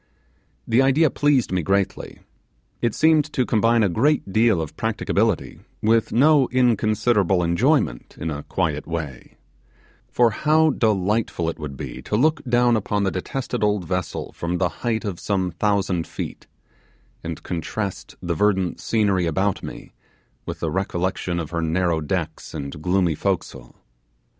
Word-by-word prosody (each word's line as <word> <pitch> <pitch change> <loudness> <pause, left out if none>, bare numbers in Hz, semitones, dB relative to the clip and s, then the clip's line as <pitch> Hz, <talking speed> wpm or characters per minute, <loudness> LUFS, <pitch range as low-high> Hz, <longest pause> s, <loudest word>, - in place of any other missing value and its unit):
The 115 +3 +4
idea 135 +3 +3
pleased 145 -7 +2
me 90 -1 +1
greatly. 95 +3 -1 0.6
It 120 -2 0
seemed 155 -1 +3
to 130 - +1
combine 115 0 +3
a - - +4
great 110 - +1
deal 110 -4 +4
of 80 -2 -5
practicability - - -1 0.2
with 110 +1 +2
no 140 +2 +4
inconsiderable 110 -6 +2
enjoyment 85 -7 +1
in 80 - -3
a 75 -1 -4
quiet 75 -3 -2
way; 80 -6 -6 0.7
for 120 -2 +3
how 155 +6 +3
delightful 105 -6 0
it - - -14
would 70 -3 -6
be - - -7
to - - -3
look 150 +5 +2
down 120 -1 +3
upon 105 -1 -1
the 95 - +1
detested 120 +5 -3
old 105 -3 +1
vessel 90 -1 -3
from 85 +1 -3
the 90 0 +1
height 115 -2 -1
of 95 -4 -4
some 95 -3 -1
thousand 95 -2 0
feet, - - -7 0.8
and 80 -1 -6
contrast 90 - -4
the 85 -1 -1
verdant 95 -1 +1
scenery 100 -6 +1
about 95 +4 0
me - - -9 0.5
with - - -6
the - - -1
recollection 90 -1 -2
of 80 -2 -5
her 85 -1 -1
narrow 85 0 0
decks 80 0 -4
and 70 0 -6
gloomy 90 -1 +2
forecastle! - - -3
100 Hz, 150 wpm, -22 LUFS, 85-115 Hz, 0.8 s, The